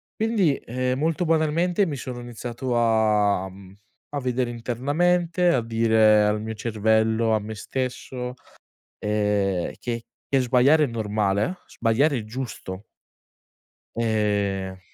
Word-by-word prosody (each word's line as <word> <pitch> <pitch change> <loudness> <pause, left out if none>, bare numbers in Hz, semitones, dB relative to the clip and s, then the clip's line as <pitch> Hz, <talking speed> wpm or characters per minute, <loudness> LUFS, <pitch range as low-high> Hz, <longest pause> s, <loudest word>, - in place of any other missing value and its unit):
Quindi, 215 -10 +2
ehm, 130 +2 -2
molto 165 +3 0
banalmente, 165 +4 +2
mi 150 - -3
sono 125 -1 -6
iniziato 120 +1 -4
a, 105 -4 +2
mhmm, 95 0 -14 0.4
a 145 - -3
vedere 125 -1 -1
internamente, 165 +9 0
a 130 -7 +3
dire 110 -2 +4
al 105 0 +1
mio 110 +1 -4
cervello, 110 +1 +1
a 110 - +3
me 110 +1 -7
stesso, 125 +1 -4 0.7
ehm: 105 -3 0
"Che 115 -1 -4 0.2
che 135 - +2
sbagliare 130 +5 +4
è - - +1
normale, 105 - -1
sbagliare 135 +5 +1
è 110 - -6
giusto." 110 -5 -6 1.1
Ehm 100 -4 0
115 Hz, 120 wpm, -24 LUFS, 105-135 Hz, 1.1 s, dire